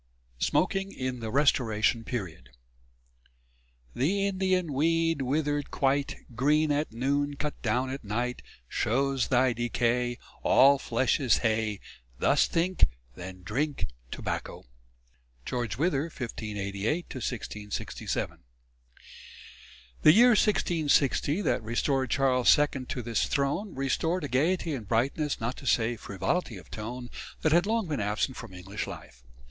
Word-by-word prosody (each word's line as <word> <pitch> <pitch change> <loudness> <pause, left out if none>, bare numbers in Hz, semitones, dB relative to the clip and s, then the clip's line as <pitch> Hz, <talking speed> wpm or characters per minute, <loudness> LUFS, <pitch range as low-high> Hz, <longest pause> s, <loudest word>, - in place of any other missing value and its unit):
V - - +2
SMOKING 195 0 +1
IN 130 -5 -4
THE 115 -1 -4
RESTORATION 115 -4 +2
PERIOD 90 - -5 1.4
The 195 +10 +1
Indian 185 -4 0
weed 165 +2 +2
withered 145 +2 0
quite 140 +1 0 0.2
Green 150 +5 +2
at 145 +2 0
noon, 140 +5 0
cut 150 +1 -4
down 125 +3 0
at 135 0 -6
night, 120 +4 -2 0.3
Shows 135 - 0
thy 130 -1 +3
decay 120 +1 0 0.2
All 140 +1 +6
flesh 125 +3 +1
is 130 -7 +3
hay: 110 -2 0 0.4
Thus - - +3
think, 180 +2 +2 0.3
then 90 +3 -9
drink 135 - -2 0.2
tobacco. - - -4 0.8
GEORGE 120 -3 -2
WITHER 150 -1 +1
(1588 110 - -3
1667). 110 -5 -4 1.6
The 155 - +8
year 240 +4 +7
1660 165 - +2
that - - +1
restored 130 +4 0
Charles 130 -3 +4
II 145 -3 0
to 125 - -4
his 115 0 0
throne, 145 +9 -1
restored 160 +6 0
a - - -2
gaiety 160 +6 +1
and 115 -7 -5
brightness, 135 +7 0
not 115 +3 -3
to - - -8
say 115 +1 +2
frivolity 105 - -2
of 90 - -14
tone, 120 +3 -6 0.3
that 155 - +3
had 175 +4 +4
long 225 -3 0
been 145 -8 -2
absent 105 +6 -1
from - - -9
English 95 +3 -5
life. - - -10
130 Hz, 130 wpm, -28 LUFS, 115-150 Hz, 1.6 s, The